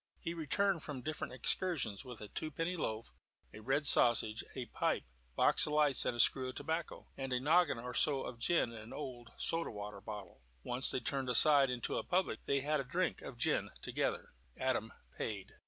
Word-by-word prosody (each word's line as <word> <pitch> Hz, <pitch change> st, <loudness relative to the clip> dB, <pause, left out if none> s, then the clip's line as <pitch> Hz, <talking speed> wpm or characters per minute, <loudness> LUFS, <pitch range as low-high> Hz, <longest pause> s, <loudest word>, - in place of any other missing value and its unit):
He 170 Hz, -, -4 dB
returned 170 Hz, +3 st, 0 dB
from 140 Hz, -5 st, -6 dB
different 155 Hz, 0 st, -4 dB
excursions 130 Hz, -, 0 dB
with 125 Hz, -3 st, -9 dB
a 105 Hz, -, -7 dB
twopenny 165 Hz, -, -3 dB
loaf, 110 Hz, -8 st, -4 dB, 0.4 s
a -, -, -10 dB
red 135 Hz, +7 st, 0 dB
sausage, 115 Hz, -4 st, +5 dB
a 130 Hz, -2 st, -4 dB
pipe, -, -, -1 dB, 0.3 s
box -, -, +4 dB
of 150 Hz, -, -3 dB
lights 150 Hz, -3 st, +4 dB
and 120 Hz, -1 st, -1 dB
screw 130 Hz, +2 st, +5 dB
of 130 Hz, -, -8 dB
tobacco, 160 Hz, +3 st, -4 dB
and 135 Hz, -1 st, -5 dB
a 125 Hz, -, +1 dB
noggin 155 Hz, +1 st, +3 dB
or 125 Hz, +2 st, -6 dB
so 140 Hz, 0 st, +2 dB
of 120 Hz, -2 st, -7 dB
gin 165 Hz, -2 st, +1 dB
in 115 Hz, -, -9 dB
an 110 Hz, +2 st, -10 dB
old 125 Hz, -5 st, -7 dB
soda 165 Hz, 0 st, 0 dB
water 105 Hz, -1 st, -7 dB
bottle. 105 Hz, -3 st, -9 dB, 0.2 s
Once 125 Hz, +2 st, +2 dB
they -, -, +1 dB
turned 130 Hz, +2 st, -2 dB
aside 140 Hz, +2 st, +7 dB
into 125 Hz, -1 st, -2 dB
a -, -, -5 dB
public, 185 Hz, +1 st, 0 dB
and 140 Hz, -1 st, +1 dB
had 150 Hz, +1 st, 0 dB
a -, -, -2 dB
drink 170 Hz, +8 st, -2 dB
of 130 Hz, -, -9 dB
gin 125 Hz, -, 0 dB
together. -, -, -2 dB, 0.3 s
Adam 130 Hz, -3 st, -1 dB, 0.2 s
paid. 105 Hz, -4 st, -5 dB
130 Hz, 190 wpm, -34 LUFS, 120-155 Hz, 0.4 s, aside